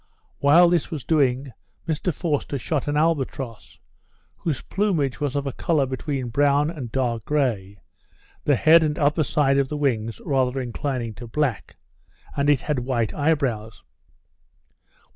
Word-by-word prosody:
While 160 +5 +6
this 175 -3 +1
was 150 -6 -5
doing, 135 -3 +1 0.4
Mr 160 +3 -1
Forster 150 -3 -2
shot 145 +2 -2
an 145 0 0
albatross, 135 - -2 0.6
whose 155 -6 -3
plumage 165 - 0
was 145 -2 -2
of 140 0 -1
a 135 - -2
colour 155 -1 +1
between 130 -1 -3
brown 145 +4 +2
and 135 -9 -7
dark 120 -3 -1
grey, 115 -10 -1 0.7
the 145 - +4
head 160 +6 +6
and 150 -1 0
upper 150 +2 +2
side 140 -1 +2
of 135 -1 0
the 150 - -3
wings 115 -6 -1
rather 130 -2 +1
inclining 125 -2 -3
to 120 - -7
black, 130 -2 -2 0.6
and 140 +1 +1
it 145 -3 +3
had 150 -4 -1
white 120 -3 -1
eye 155 +2 +2
brows. 115 -6 -4
140 Hz, 150 wpm, -23 LUFS, 125-150 Hz, 0.7 s, While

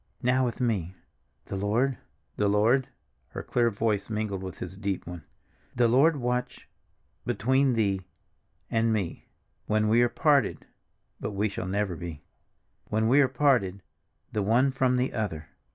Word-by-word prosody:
Now 125 +1 +3
with 120 - -3
me. 100 -8 -1 0.5
'The 100 - -5
Lord'—'The 105 0 -2
Lord,'"—her 105 - -1
clear 120 -1 +2
voice 105 -1 -1
mingled 105 -3 -2
with 95 -2 -7
his 90 +1 -7
deep 100 -1 -3
one. 85 -3 -8 0.5
"The 120 -1 +4
Lord 140 +7 +4
watch—between 125 +1 -2
thee—and 110 +2 -3
me—when 105 +2 -3
we 115 +3 +4
are 120 - +4
parted—(but 145 -7 -1
we 100 +1 -1
never 100 +2 -1
shall 85 - -8
be!) 85 -4 -7 0.6
when 110 +1 0
we 140 +4 +6
are 135 - +4
parted—the 105 -6 -1
one 120 +7 +3
from 130 -1 +1
the 125 +1 0
other." 85 -9 -3
110 Hz, 125 wpm, -27 LUFS, 100-125 Hz, 0.6 s, we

